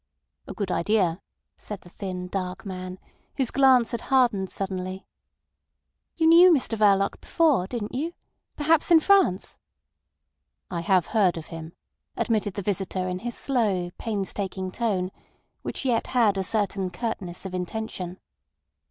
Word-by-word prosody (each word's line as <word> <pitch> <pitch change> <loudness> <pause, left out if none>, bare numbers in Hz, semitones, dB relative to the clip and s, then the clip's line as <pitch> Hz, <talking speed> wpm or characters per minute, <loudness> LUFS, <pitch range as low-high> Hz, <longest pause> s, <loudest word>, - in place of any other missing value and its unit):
"A - - -7
good 200 -4 -2
idea," 185 -2 +1 0.4
said 210 -2 -7
the 175 - -15
thin, 180 -1 -5
dark 185 +1 -4
man, 185 -1 -6 0.4
whose 265 -4 +1
glance 260 -3 +5
had 235 -2 -3
hardened 240 -8 +2
suddenly. 190 -1 -4 1.1
"You 325 - +1
knew 340 +3 +8
Mr 265 -7 +2
Verloc 200 -2 +3
before—didn't 240 - +1
you? 310 +7 -2 0.4
Perhaps 310 +1 +3
in 335 -2 +8
France?" 365 - +2 1.1
"I 170 -2 -2
have 180 -1 +3
heard 195 -6 +2
of 160 - -6
him," 165 0 -8 0.4
admitted 215 -4 0
the 200 - -3
visitor 190 -1 -2
in 180 0 -3
his 240 +2 -5
slow, 205 -10 0
painstaking 195 -3 -3
tone, 190 -5 -1 0.5
which - - -5
yet 240 -3 +1
had 230 -5 +3
a 195 - 0
certain 195 -2 -1
curtness 185 -3 -5
of 190 - -6
intention. 180 -1 -4
200 Hz, 135 wpm, -25 LUFS, 185-240 Hz, 1.1 s, knew